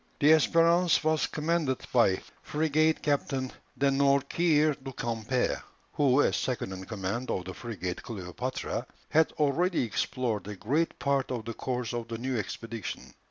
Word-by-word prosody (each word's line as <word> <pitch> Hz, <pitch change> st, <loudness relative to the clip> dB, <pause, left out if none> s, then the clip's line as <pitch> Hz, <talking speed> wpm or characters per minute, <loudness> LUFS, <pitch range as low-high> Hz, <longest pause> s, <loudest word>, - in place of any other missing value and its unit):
The 145 Hz, +2 st, +6 dB
Espérance 165 Hz, +2 st, +4 dB
was 155 Hz, -2 st, +2 dB
commanded 155 Hz, -4 st, 0 dB
by 115 Hz, -7 st, +4 dB, 0.2 s
Frigate 155 Hz, +1 st, +1 dB
Captain 135 Hz, -3 st, 0 dB, 0.3 s
De 140 Hz, -1 st, +3 dB
Nourquer 145 Hz, +3 st, +3 dB
du 135 Hz, -, -5 dB
Camper, 115 Hz, +1 st, -1 dB, 0.3 s
who, 140 Hz, -1 st, +4 dB
as 100 Hz, -, +2 dB
second 120 Hz, -4 st, -2 dB
in 95 Hz, 0 st, -7 dB
command 110 Hz, +4 st, -3 dB
of 90 Hz, -, -2 dB
the 95 Hz, -, -6 dB
frigate 95 Hz, -5 st, -5 dB
Cleopatra, 110 Hz, +4 st, -4 dB, 0.2 s
had 160 Hz, 0 st, +4 dB
already 160 Hz, +4 st, +1 dB
explored 115 Hz, -2 st, -2 dB
a 105 Hz, -, -5 dB
great 145 Hz, -, 0 dB
part 140 Hz, -1 st, 0 dB
of 120 Hz, -4 st, -3 dB
the 115 Hz, -, -4 dB
course 125 Hz, 0 st, -3 dB
of 120 Hz, -1 st, -3 dB
the 115 Hz, 0 st, -4 dB
new 130 Hz, +2 st, -2 dB
expedition. 115 Hz, -1 st, -5 dB
130 Hz, 150 wpm, -29 LUFS, 115-150 Hz, 0.3 s, The